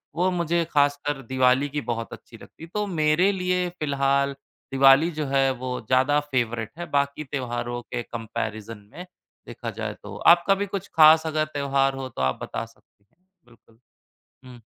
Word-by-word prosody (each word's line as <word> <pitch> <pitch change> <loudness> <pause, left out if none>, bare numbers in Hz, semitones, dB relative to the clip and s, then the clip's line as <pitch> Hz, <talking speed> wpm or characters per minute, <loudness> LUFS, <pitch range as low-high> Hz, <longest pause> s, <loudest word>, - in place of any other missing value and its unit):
वो 180 +3 +2
मुझे 170 -1 0
ख़ासकर 145 -1 +1
दिवाली 130 +2 +2
की 145 +1 -3
बहुत 115 -2 -4
अच्छी - - -13
लगती - - -15
हैं। 165 - -10
तो 210 0 -1
मेरे 165 +2 +2
लिए 180 -1 -1
फिलहाल 140 -1 +1 0.4
दिवाली 135 +5 +5
जो 155 -2 -3
है 135 0 +2
वो 125 0 -4
ज़्यादा 130 +3 +3
फेवरेट 120 -3 -1
है, 175 - -5
बाकी 140 +1 0
त्यौहारों 120 -3 -4
के 120 0 -5
कम्पैरिज़न 110 -2 -6
में 180 - -9 0.4
देखा - - -6
जाए - - -5
तो। - - -9
आपका 175 +3 +5
भी 200 +1 -2
कुछ 195 0 -5
ख़ास 160 0 +7
अगर 155 -1 0
त्यौहार 140 -1 +1
हो 135 -1 -6
तो 115 - -7
आप 65 0 0
बता - - -4
सक 115 - -22 0.6
बिल्कुल। 115 -1 -24 0.7
हुँ। 125 -2 -13
140 Hz, 165 wpm, -24 LUFS, 125-160 Hz, 0.7 s, ख़ास